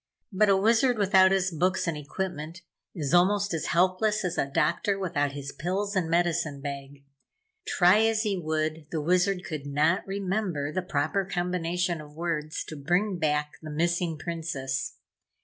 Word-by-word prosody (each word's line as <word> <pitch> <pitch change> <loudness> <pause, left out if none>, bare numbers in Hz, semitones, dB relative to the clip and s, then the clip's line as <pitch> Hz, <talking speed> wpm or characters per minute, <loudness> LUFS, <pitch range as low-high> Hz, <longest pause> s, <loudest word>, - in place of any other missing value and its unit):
But 210 +1 +3
a 195 - +5
Wizard 230 +4 +3
without 190 -2 +5
his 190 -1 +1
books 180 +3 0
and 165 -2 -1
equipment, 165 +2 -5 0.3
is 150 -3 -2
almost 200 +2 +3
as 165 - -2
helpless 185 +4 +2
as 180 -1 -1
a - - 0
doctor 175 +8 +1
without 155 -7 -1
his 140 -1 -6
pills 200 +4 -2
and 180 -4 0
medicine 165 -4 +1
bag. 140 0 -7 0.6
Try 180 +3 +5
as 220 -1 +1
he 210 -3 0
would, 155 -2 -2
the 160 - -2
Wizard 180 +4 +1
could 150 -3 -5
not 150 +6 +2
remember 190 -6 -2
the 185 - -1
proper 175 +2 0
combination 180 -2 -1
of 150 0 -13
words 160 -2 -3
to 155 - -8
bring 175 +6 0
back 150 -1 0
the 155 - -8
missing 170 +1 0
Princess. 145 -5 -3
175 Hz, 160 wpm, -27 LUFS, 150-190 Hz, 0.6 s, a